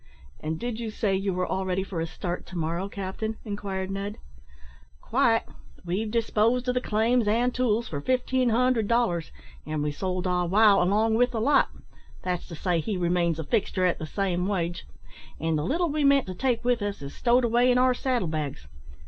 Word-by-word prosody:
"And 160 +1 -3
did 240 -2 -4
you 230 -2 -3
say 210 -2 0
you 195 +1 -1
were 180 0 -1
all 190 - -2
ready 190 0 -1
for 185 -4 -4
a 165 - -2
start 175 +2 -5
to 180 - -7
morrow, 170 +4 -2
captain?" 200 +3 -4
inquired 195 -2 -4
Ned. 200 +2 -4 0.8
"Quite. 230 - +2 0.4
We've 195 +6 -1
disposed 230 +2 +1
of 250 - +2
the 250 - 0
claims 225 +1 +1
and 240 +4 +2
tools 235 -2 +1
for 145 -2 -4
fifteen 255 - +1
hundred 235 -1 +2
dollars, 200 -9 +1 0.3
an' 155 -1 -3
we 150 - 0
sold 185 +3 -3
Ah 180 -1 +1
wow 200 +2 +5
along 210 +5 +2
with 245 +3 +3
the 235 -2 -3
lot; 275 +5 +3 0.5
that's 180 -1 -2
to 170 - -8
say, 175 +1 0
he 195 +5 -2
remains 175 -2 +1
a 160 - -3
fixture 185 +4 0
at 180 - +1
the 155 - -5
same 185 -1 -1
wage; 175 -3 -2 0.5
and 160 +1 0
the 150 - 0
little 335 - 0
we 300 0 0
meant 280 -1 +4
to 185 - -5
take 245 +3 -1
with 245 -2 +2
us 205 -6 -3
is 140 - -7
stowed 245 0 +3
away 240 +2 +3
in 250 - +3
our 255 0 +4
saddle 245 -6 -1
bags. 150 - -4
200 Hz, 200 wpm, -26 LUFS, 180-240 Hz, 0.8 s, wow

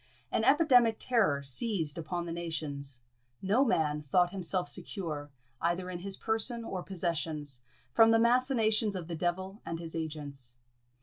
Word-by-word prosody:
An - - +1
epidemic 245 -8 +5
terror 195 - +2
seized 155 - +1
upon 170 +1 -3
the 170 - -5
nations; 145 -6 -4 0.4
no 205 +8 +3
man 150 - +1
thought 175 +5 +2
himself 185 -2 -1
secure, 150 -2 -5 0.3
either 175 +2 0
in 175 - -5
his 195 +1 -4
person 225 +2 -1
or 190 -5 -4
possessions, 160 -7 -2 0.3
from 225 0 +7
the 225 - +6
machinations 230 -3 +3
of 175 -3 -5
the 170 - -4
devil 185 +5 -2
and 165 - -4
his 165 0 -7
agents. 145 -6 -4
175 Hz, 145 wpm, -31 LUFS, 155-215 Hz, 0.4 s, from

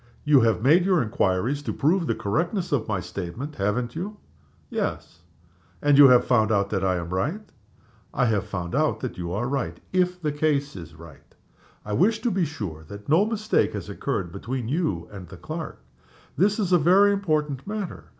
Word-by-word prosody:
"You 150 -2 +5
have 115 -2 +2
made 160 +7 +5
your 185 -2 +3
inquiries 110 +6 0
to - - -3
prove 165 +3 +1
the 115 - 0
correctness 170 - -1
of 135 -6 0
my 105 -4 -1
statement 90 - -6
haven't 115 +5 -1
you?" 200 +6 -5 0.5
"Yes." 85 - -4 0.6
"And 145 -1 +3
you 140 0 +9
have 125 -1 +5
found 110 -3 +3
out 100 -2 +1
that 95 -2 -1
I 95 -1 +2
am 85 -1 -4
right?" 150 - -1 0.7
"I 125 - +1
have 110 -4 +1
found 85 -3 -5
out 155 +2 +1
that 125 -7 -5
you 85 -1 -4
are 105 +6 -2
right 135 -12 -3
if 180 -1 +1
the 155 -4 -1
case 145 -1 0
is 85 -3 -10
right. 80 -2 -15 0.5
I 105 - -4
wish 210 - +3
to 240 - +1
be 185 -2 +1
sure 100 - -6
that 100 - -10
no 165 +7 +5
mistake 215 -1 0
has - - -6
occurred 85 -3 -3
between 120 +5 -4
you 115 - -1
and 95 -3 -9
the - - -11
clerk. - - -7 0.5
This 205 +3 +2
is 190 -5 0
a 175 - +6
very 195 +6 +5
important 155 -8 -1
matter. 210 -3 -5
135 Hz, 190 wpm, -25 LUFS, -, 0.7 s, you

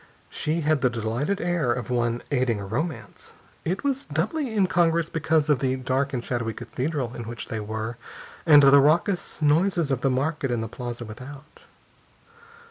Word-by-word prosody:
She 160 +2 -1
had 155 -2 +1
the 130 - +3
delighted 120 - -2
air 175 -8 0
of 120 -2 -3
one 120 -1 0
aiding 125 -5 +1
a 100 - -5
romance. 145 - -5 0.3
It 185 +4 -2
was 275 -1 -1
doubly 215 - -1
incongruous 170 -5 +2
because 160 -1 +1
of 150 -4 +3
the 130 -1 0
dark 130 +2 -1
and 125 -3 -3
shadowy 115 -2 -2
Cathedral 130 -3 -3
in 120 - -6
which 115 0 -7
they 110 - -3
were, 110 +2 -4 0.5
and 150 -3 +7
the 140 +1 +8
raucous 160 +3 +1
noises 165 +1 +2
of 130 -2 0
the 135 - +2
market 140 +2 -1
in 120 -2 -1
the 115 - -3
plaza 120 +1 -6
without. 130 +6 -11
140 Hz, 170 wpm, -25 LUFS, 120-160 Hz, 0.5 s, the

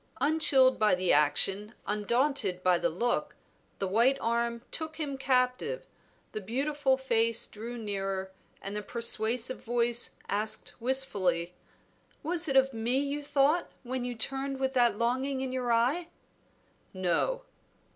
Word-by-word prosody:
Unchilled 275 -3 +4
by 215 -3 +4
the 180 0 +2
action, 195 +9 +2
undaunted 210 -2 0
by 180 -1 +4
the - - +1
look, 240 +9 -1 0.4
the 195 - -2
white 235 +8 +3
arm 235 0 -1
took 315 -1 -3
him 295 -4 -3
captive, 265 - 0 0.5
the 215 - -5
beautiful 270 +5 0
face 230 -3 +2
drew 230 +3 -7
nearer, 195 -3 -3 0.3
and 200 +1 -4
the 210 - -2
persuasive 235 +2 -1
voice 240 0 0
asked 215 +1 -1
wistfully 195 -10 0 0.7
"Was 340 +2 0
it 275 - -1
of 265 0 +4
me 230 +3 0
you 285 +1 -1
thought 290 +4 +2
when 255 0 -3
you 245 -1 -3
turned 270 +4 -2
with 265 0 0
that 240 -4 +3
longing 260 +4 0
in 265 -1 -3
your 250 -2 -1
eye?" 255 +9 +2 0.9
"No." 185 - 0
240 Hz, 135 wpm, -29 LUFS, 215-270 Hz, 0.9 s, Unchilled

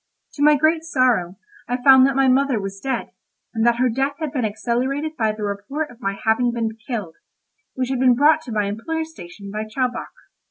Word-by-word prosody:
To 285 - -7
my 300 0 +6
great 315 +3 +2
sorrow 250 - +1 0.3
I 245 - -1
found 265 -1 +8
that 275 - -1
my 270 0 +3
mother 265 -2 +2
was 195 0 -6
dead, 265 +5 -3 0.4
and 225 -1 -1
that 235 - +4
her 255 +2 +2
death 270 +4 -1
had 310 -3 -4
been 255 -3 -2
accelerated 250 +8 -2
by 220 -5 +1
the 215 0 -7
report 210 +10 -4
of 245 +1 -18
my 195 -1 -2
having 235 +2 +2
been 225 -2 -3
killed, 210 -10 -4 0.6
which 255 -1 -2
had 265 -2 -1
been 250 -1 +5
brought 305 +4 +4
to 245 - -7
my 210 -2 0
employer's 320 +11 -4
station 195 - -11
by 215 +1 -4
Chowbok. 245 +3 -3
250 Hz, 205 wpm, -21 LUFS, 215-275 Hz, 0.6 s, found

